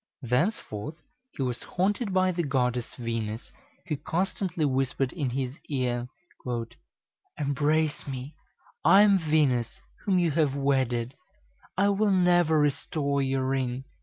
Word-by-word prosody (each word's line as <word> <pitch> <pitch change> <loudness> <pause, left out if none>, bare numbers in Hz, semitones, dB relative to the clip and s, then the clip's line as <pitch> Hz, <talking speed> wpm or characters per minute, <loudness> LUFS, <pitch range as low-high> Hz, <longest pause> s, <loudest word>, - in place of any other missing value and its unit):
Thenceforth 125 - -1 0.3
he 140 - -4
was 125 -2 -2
haunted 200 +4 -1
by 185 0 +3
the 175 -1 -1
Goddess 125 -5 -1
Venus, 115 -2 -4 0.3
who 155 -6 -2
constantly 175 0 -1
whispered 135 -1 0
in 145 -7 -1
his 130 +2 -3
ear, 125 -3 -1 1.3
"Embrace 150 +2 0
me; 135 +2 -5 0.5
I 190 +4 +7
am 200 -2 +5
Venus, 150 -1 +1 0.2
whom 195 -3 +2
you 175 -3 +2
have 145 -2 +1
wedded; 130 -3 0 0.6
I 200 +2 +4
will 205 +1 +2
never 175 -4 +4
restore 140 -1 0
your 135 -1 0
ring." 130 -1 -1
140 Hz, 125 wpm, -27 LUFS, 130-175 Hz, 1.3 s, I